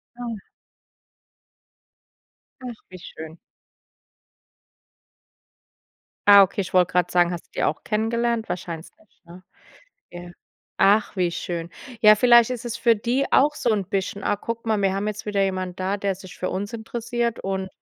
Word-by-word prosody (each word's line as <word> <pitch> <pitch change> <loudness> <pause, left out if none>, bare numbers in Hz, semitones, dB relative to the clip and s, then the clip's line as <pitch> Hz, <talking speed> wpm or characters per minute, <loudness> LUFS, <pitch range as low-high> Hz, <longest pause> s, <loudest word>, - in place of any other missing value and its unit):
Ja. 240 -2 -5 2.2
Ach, 250 -2 -6 0.2
wie 185 - -10
schön. 160 -1 -10 2.9
Ah, 200 -1 +10
okay, 190 - -3
ich 190 - -3
wollte 180 -2 +3
gerade 180 0 +1
sagen, 175 0 +3
hast 175 -2 -6
du - - -62
die - - -1
auch 155 - -1
kennengelernt? 230 +1 -1
Wahrscheinlich 170 -2 -5
nicht, 215 - -30
ne? 175 +2 -14 0.7
Ja, 175 0 -10 0.5
ach, 205 +1 +3
wie 180 -2 +2
schön. 170 0 -5 0.3
Ja, 215 -1 +7
vielleicht 240 0 +5
ist 250 -3 -4
es 235 -1 -4
für 230 -1 +3
die 245 +6 -1
auch 295 +2 +4
so 240 - 0
'n 205 -2 -1
bisschen: 195 0 -3
„Ah, 205 - 0
guck 230 +2 -6
mal, 215 -2 0
wir 195 -1 +1
haben 195 +1 -2
jetzt 210 +1 -5
wieder 200 -2 0
jemand 185 -1 -3
da, 195 +2 -1
der 200 -1 -2
sich 185 -1 -13
für 185 - -3
uns 200 +2 -4
interessiert 235 +1 -3
und“ 190 0 -3
200 Hz, 160 wpm, -23 LUFS, 185-230 Hz, 2.9 s, Ah